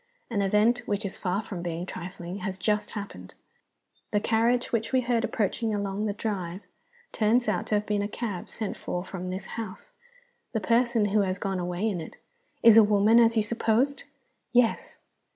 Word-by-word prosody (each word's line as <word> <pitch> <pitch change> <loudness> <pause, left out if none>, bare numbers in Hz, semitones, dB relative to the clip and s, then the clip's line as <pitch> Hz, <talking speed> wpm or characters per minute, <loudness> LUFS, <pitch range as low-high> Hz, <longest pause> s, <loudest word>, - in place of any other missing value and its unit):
"An 205 -3 +1
event, 210 +5 +3
which 205 0 -1
is 190 - -3
far 190 +4 -1
from 190 -4 -6
being 170 0 -3
trifling, 180 0 -7
has 190 -2 -4
just 210 +2 0
happened. 95 - -8 0.7
The 205 - +1
carriage 230 +3 +1
which 225 -1 -1
we 260 -1 +3
heard 240 -2 0
approaching 220 -1 -1
along 200 +1 -2
the 205 - -1
drive 195 -4 -4 0.5
turns 230 +2 +2
out 200 -4 0
to 215 - +1
have 210 0 0
been 210 -1 0
a 205 - -1
cab 210 -4 -5
sent 215 -3 -4
for 180 +1 -4
from 185 -1 -6
the 185 +1 -2
house. 215 - -7 0.6
The 220 - +1
person 230 +1 +2
who 215 - +4
has 190 -1 -1
gone 195 -2 -2
away 180 +4 -1
in 190 -6 -2
it 160 - -10 0.3
" - - -42
"Is 225 -1 +9
a 225 - +10
woman, 210 +2 +5
as 230 -1 +4
you 215 - +4
supposed?" 235 +5 +1 0.5
"Yes." 240 -2 +2
210 Hz, 190 wpm, -27 LUFS, 190-225 Hz, 0.7 s, a